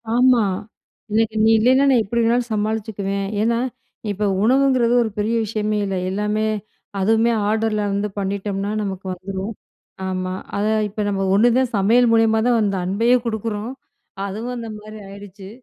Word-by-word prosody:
ஆமா. 250 -2 +5 0.7
எனக்கு 220 0 +1
நீ - - +5
இல்லயின்னா 260 +5 +4
நான் 250 -4 +4
எப்பிடி 235 +3 -1
வேணாலும் 240 +1 +1
சமாளிச்சுக்குவேன். 205 -2 -2 0.2
ஏன்னா, 230 +1 +2 0.5
இப்ப 205 +1 -2 0.2
உணவுங்கிறது 255 -1 +3
ஒரு 225 - -2
பெரிய 215 +3 0
விஷயமே 215 0 -1
இல்ல. 195 -1 -2
எல்லாமே, 210 +2 -1 0.5
அதுவுமே 225 +4 +3 0.2
ஆர்டர்ல 220 0 0
வந்து 200 +1 -1
பண்ணிட்டம்ன்னா 200 0 -2
நமக்கு 190 -1 -5
வந்துரும். 190 +3 -5 0.5
ஆமா. 185 0 -3 0.2
அத 205 - 0 0.2
இப்ப 210 +2 -5
நம்ம 195 -1 -1
ஒண்ணுதான் 240 +4 +3
சமையல் 230 +5 +4
மூலியமா 225 -1 +4
தான் 240 -2 +3
அந்த 200 -2 0
அன்பையும் 230 +6 +2
குடுக்குறோம். 220 0 -3 0.5
அதுவும் 220 +5 -4
அந்தமாரி 215 -2 -8
ஆயிடுச்சு. 200 -1 -11
215 Hz, 140 wpm, -21 LUFS, 200-230 Hz, 0.7 s, ஆமா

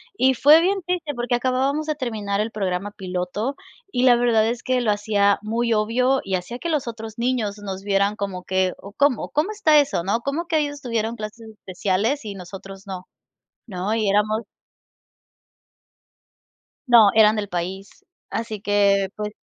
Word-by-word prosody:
Y 260 -4 +3
fue 300 +6 +7
bien 385 +2 0
triste 345 -5 -2
porque 240 +1 -2
acabábamos 265 +5 0
de 305 - -1
terminar 215 -6 -3
el 220 +1 -3
programa 195 0 -2
piloto 190 +7 -3 0.4
y 245 - 0
la 245 -2 +7
verdad 230 -2 +3
es 235 +1 -2
que 255 -1 0
lo 215 -3 +2
hacía 205 -1 +2
muy 230 +2 0
obvio 250 +5 +2
y 190 -1 -1
hacía 235 +8 -5
que 340 - -3
los 300 -6 -1
otros 225 -1 -7
niños 235 -4 -1
nos 195 -2 -6
vieran 200 +1 +1
como 195 -3 -4
que: 185 -1 0
“¿O 200 - -11
cómo? 280 -3 +1
¿Cómo 305 +7 0
está 315 -8 +4
eso? 275 -12 0
¿No? 200 +5 0
¿Cómo 295 +6 -2
que 320 -2 +1
ellos 290 -1 -3
tuvieron 230 -1 -2
clases 220 +1 -8
especiales 210 +6 -2
y 205 -2 -6
nosotros 195 +1 -10
no?", 185 -2 -7 0.6
¿no? 195 +2 -2
Y 215 -3 +1
éramos 215 +2 +2 2.5
No, 230 -4 +7
eran 215 0 +6
del 205 - -2
país. 185 +3 -5 0.2
Así 225 -2 -4
que, 200 -1 +3
pues 210 0 -3
220 Hz, 170 wpm, -22 LUFS, 200-255 Hz, 2.5 s, fue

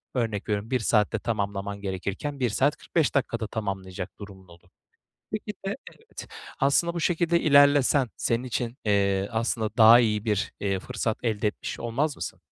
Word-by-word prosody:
Örnek 110 -5 -2
veriyorum, 105 +3 -2
1 130 - +2
saatte 110 -1 +1
tamamlaman 100 -2 -3
gerekirken 100 +9 -4
1 125 -2 +1
saat 135 +7 +1
45 160 -3 0
dakikada 115 -5 -1
tamamlayacak 95 -3 -5
durumun 95 -2 -11
olur. 85 +1 -19 0.6
Belki 215 0 -4
de 195 - -2
evet, 450 - -12 0.3
aslında 145 +5 +2
bu 170 - -2
şekilde 170 0 +2
ilerlesen 140 -3 +5
senin 115 +2 -1
için, 120 -1 -3
eee, 100 -2 +1
aslında 115 -1 -1
daha 115 +1 +8
iyi 105 -3 0
bir 105 -3 -1 0.3
fırsat 110 +3 -3
elde, 115 -3 0
eee, - - +5
etmiş - - -6
olmaz 140 +6 -1
mısın? - - -6
115 Hz, 160 wpm, -26 LUFS, 100-140 Hz, 0.6 s, daha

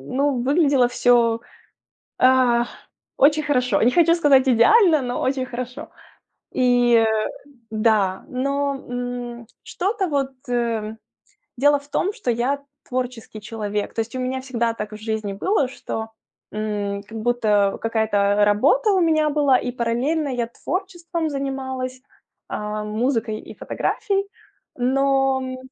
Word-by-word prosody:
ну, 275 -2 +1
выглядело 275 -2 +3
всё, 235 -2 +3 0.8
а, 255 -2 +4 0.5
очень 305 +2 +4
хорошо. 250 -8 +1
Не 240 - +5
хочу 335 +3 +4
сказать 275 -5 +4
идеально, 315 - +5
но 245 0 -3
очень 260 0 -1
хорошо. 250 +5 -6 0.7
И 245 -2 +4 0.7
да, 215 -4 +1
но, 280 +2 -1
м, 245 -1 -5 0.2
что-то 390 +1 -2
вот 275 -3 -1 1.3
дело 290 +2 +4
в 285 - -19
том, 380 +7 0
что 245 - -2
я 255 +5 0 0.3
творческий 250 -4 -4
человек. 210 -1 -4
То - - -5
есть 225 +3 -7
у - - -3
меня 255 +1 -2
всегда 235 -3 -1
так 210 -1 -6
в - - -7
жизни 215 -2 -3
было, 285 - +1
что, 225 -3 -5 0.5
м, 205 -2 -3
как 225 +2 -9
будто 215 -4 +1
какая-то 205 -2 +2
работа 285 - +3
у 380 - +3
меня 310 -2 +3
была 285 -3 +3
и 245 - -3
параллельно 255 +6 -1
я 245 -2 -2
творчеством 340 - -4
занималась, 260 -2 -4 0.5
а, 210 0 -4
музыкой 220 0 -1
и - - -11
фотографией. 395 -2 -1 0.5
Но, 270 +1 +2
м, 255 0 -5
250 Hz, 130 wpm, -22 LUFS, 225-280 Hz, 1.3 s, Не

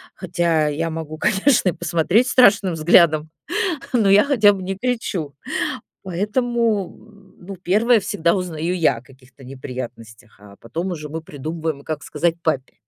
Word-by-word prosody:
хотя 170 -4 0
я 165 +3 -2
могу, 160 -1 -6
конечно, 210 - +2
и - - +1
посмотреть 175 +8 +1
страшным 205 -8 +4
взглядом, 155 -1 +4 0.6
но 225 -5 +3
я 200 +1 +7
хотя 225 -8 +4
бы 190 -2 -6
не 190 +1 -4
кричу. 195 - -3 0.7
Поэтому, 215 +2 -1 0.5
ну, 190 +2 -9
первая 215 +7 +3
всегда 170 -3 0
узнаю 175 -1 -3
я 155 -8 +2
о - - -15
каких-то 130 0 -20
неприятностях, 125 -3 -9
а 100 -1 -15
потом 170 +10 -4
уже 150 -3 -6
мы 160 +2 -5
придумываем, 155 0 -5
как 155 -1 -5
сказать 170 -1 -1
папе. 140 -5 -2
170 Hz, 145 wpm, -21 LUFS, 150-195 Hz, 0.7 s, я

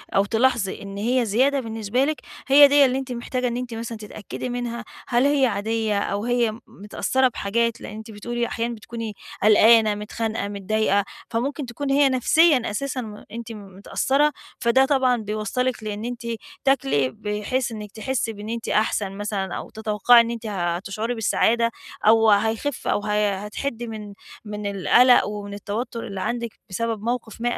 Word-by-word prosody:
أو 195 +1 +4
تلاحظي 230 -2 +1
إن 200 0 -8
هي 240 +3 +1
زيادة 265 +7 +2
بالنسبة 225 +2 -1
لِك، 310 0 -2 0.3
هي 285 +1 +9
دِيَّة 285 0 +6
اللي 260 +1 +1
أنتِ 265 -1 -5
محتاجة 250 +1 -2
إن 240 0 -2
أنتِ 250 -2 -5
مثلًا 230 0 -5
تتأكدي 215 +3 -7
منها، 240 -1 -4 0.2
هل 245 +2 +2
هي 285 -2 +4
عادية 220 -1 -1
أو 200 +2 -2
هي 240 -2 +1
متأثرة 255 +6 0
بحاجات 230 +1 -1
لأن 210 - -8
أنتِ 220 0 -9
بتقولي 240 +3 -3
أحيانًا 235 0 -3
بتكوني 225 0 -6 0.3
قلقانة، 215 0 +6
متخانقة، 220 0 -3
متضايقة، 205 0 +1 0.3
فممكن 270 +5 -2
تكون 275 +4 -5
هي 280 0 +5
نفسيًا 275 +2 +4
أساسًا 260 +4 -3
م 210 -2 -9
أنتِ 230 0 -7
متأثرة، 215 +8 0 0.3
فده 250 +3 +4
طبعًا 260 -3 +2
بيوصّلِك 220 +3 -2
لإن 210 +1 -4
أنتِ 245 -1 -5 0.4
تاكلي 145 - +2
بحيث 210 - -2
إنك 210 -2 -7
تحسي 230 -1 -2
بإن 210 +1 -8
أنتِ 230 0 -4
أحسن 210 -2 +1
مثلًا 205 -3 -3
أو - - -7
تتوقعي 220 +2 +4
إن 230 0 -2
أنتِ 230 -1 -6
هتشعري 195 +4 -2
بالسعادة 230 +1 +2 0.4
أو 225 0 +6
هيخف 225 +6 +1
أو - - +2
ه 210 -1 0
هتحِدّي 230 +4 -4
من 220 -1 -6 0.4
من 210 0 -6
القلق 220 +6 +5
ومن 205 -1 -6
التوتر 225 +4 -4
اللي 195 -2 -5
عندِك 235 +1 -3
بسبب 225 +2 -2
موقف 235 -2 -3
ما 240 0 0
225 Hz, 160 wpm, -23 LUFS, 210-245 Hz, 0.4 s, هي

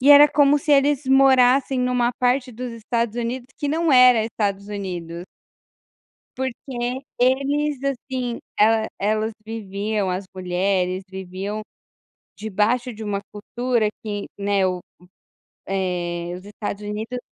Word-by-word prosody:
e 275 +3 +5
era 290 +1 +10
como 290 0 +4
se 295 +1 +1
eles 285 0 +3
morassem 265 0 +5
numa 250 -1 +1
parte 250 +1 +1
dos 245 +2 -5
Estados 230 0 -2
Unidos 240 +1 -3
que 290 - -2
não 320 0 +1
era 250 -3 +7
Estados 200 -3 -2
Unidos. 175 -4 -5 1.1
Porque 255 -1 -3 0.2
eles, 275 +3 +2
assim, 255 -2 -3 0.2
ela 220 +1 +4
elas 215 +2 0
viviam, 205 -2 -2
as 185 +2 -3
mulheres, 185 0 0
viviam 190 +3 -5 0.8
debaixo 220 +4 0
de 220 - -9
uma 205 -2 -2
cultura 235 +2 -1 0.2
que, 205 -1 -4
né, 200 -1 +2
o 180 -1 -2 0.9
o - - -6
eh, 175 -2 -2
os 185 - -13
Estados 205 0 -5
Unidos 220 +4 -4
225 Hz, 130 wpm, -22 LUFS, 200-255 Hz, 1.1 s, era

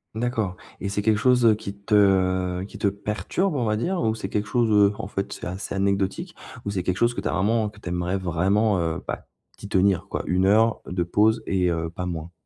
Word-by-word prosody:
D'accord. 110 -5 -1 0.2
Et 100 - -3
c'est 100 +1 -1
quelque 105 0 +2
chose, 125 0 +3
heu, 110 - +7
qui 100 -2 -7
te, 100 +2 -4
heu, 95 -2 +3
qui - - -11
te 100 - +2
perturbe, 105 - -2
on 125 - 0
va 105 -1 +1
dire, 175 - -1
ou 110 -1 +1
c'est 95 -3 -5
quelque 105 0 -1
chose, 120 0 +1
heu, 105 -1 +5
en - - -4
fait, 100 -1 -4
c'est - - -8
assez 95 +2 -5
anecdotique? 100 - -1 0.3
Ou 100 - -2
c'est 95 -2 -1
quelque 90 +1 -1
chose 120 +2 +2
que - - -4
tu - - -2
as - - -1
vraiment 105 +2 +1
que 105 0 -16
tu 85 - -6
aimerais 90 +2 -1
vraiment 95 +3 +1
heu, 85 0 -2
bah, - - -5 0.3
t'y 100 - -9
tenir, 95 -2 +2
quoi - - -3
1 90 +1 +1
heure 110 +3 +3
de 90 -1 -1
pause 110 +5 +2
et, 90 -2 +1
heu, 80 -1 -1
pas 90 +2 -5
moins? 85 -1 -5
100 Hz, 240 wpm, -24 LUFS, 90-110 Hz, 0.3 s, heu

